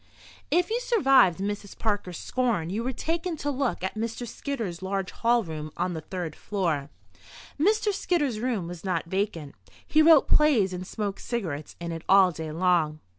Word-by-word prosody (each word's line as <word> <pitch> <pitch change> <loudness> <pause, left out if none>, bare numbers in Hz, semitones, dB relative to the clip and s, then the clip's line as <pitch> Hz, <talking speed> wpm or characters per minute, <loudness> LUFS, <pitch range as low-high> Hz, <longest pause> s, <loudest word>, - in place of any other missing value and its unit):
If 355 +3 +2
you 470 - +1
survived 270 - +4
Mrs. 200 +1 -4
Parker's 205 -6 -2
scorn, 230 -10 -1
you 220 +4 -2
were 255 - -1
taken 330 +5 -2
to 290 0 -2
look 270 -7 -1
at 190 - -2
Mr. 230 +2 -4
Skidder's 220 -9 -4
large 190 0 -2
hall 235 0 +2
room 155 -3 -6
on 180 - -1
the 160 - -5
third 170 -1 -5
floor. 165 -9 -2 0.7
Mr. 420 +5 +2
Skidder's 295 - 0
room 230 -6 -1
was 175 -1 -8
not 185 -3 -1
vacant. 170 -5 -2 0.3
He 310 - +4
wrote 315 -2 +7
plays 240 -12 +4
and 180 0 -5
smoked 205 -2 -4
cigarettes 165 -11 -4
in 170 0 -4
it 165 -1 -5
all 190 -1 +7
day 160 -1 -6
long. 165 -2 +1
200 Hz, 175 wpm, -27 LUFS, 175-260 Hz, 0.7 s, wrote